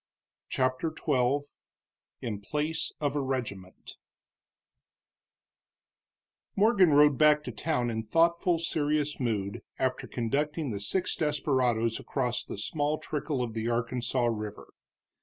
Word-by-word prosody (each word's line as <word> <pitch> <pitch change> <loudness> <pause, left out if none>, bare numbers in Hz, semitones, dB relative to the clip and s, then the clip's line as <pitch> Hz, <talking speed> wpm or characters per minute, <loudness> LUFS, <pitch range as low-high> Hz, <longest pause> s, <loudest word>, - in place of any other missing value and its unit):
CHAPTER 130 +5 0
XII 135 -1 +2 0.8
IN 105 -4 -3
PLACE 150 +8 -1
OF 145 -1 -1
A 145 - +1
REGIMENT 115 -9 -5 2.6
Morgan 200 -3 +5
rode 145 -1 +5
back 150 -1 +5
to - - -5
town 125 -7 -1
in 110 0 -2
thoughtful, 170 - +2
serious 150 -2 0
mood 105 -6 -2 0.2
after 130 -1 -1
conducting 145 +4 -1
the 100 - -3
six 180 - -1
desperadoes 130 -7 +1
across 125 -3 -1
the - - -7
small 150 -1 -1
trickle 150 -3 -2
of 115 -2 -4
the 110 +1 -2
Arkansas 120 +1 0
River. 105 -3 -4
135 Hz, 115 wpm, -29 LUFS, 115-150 Hz, 2.6 s, Morgan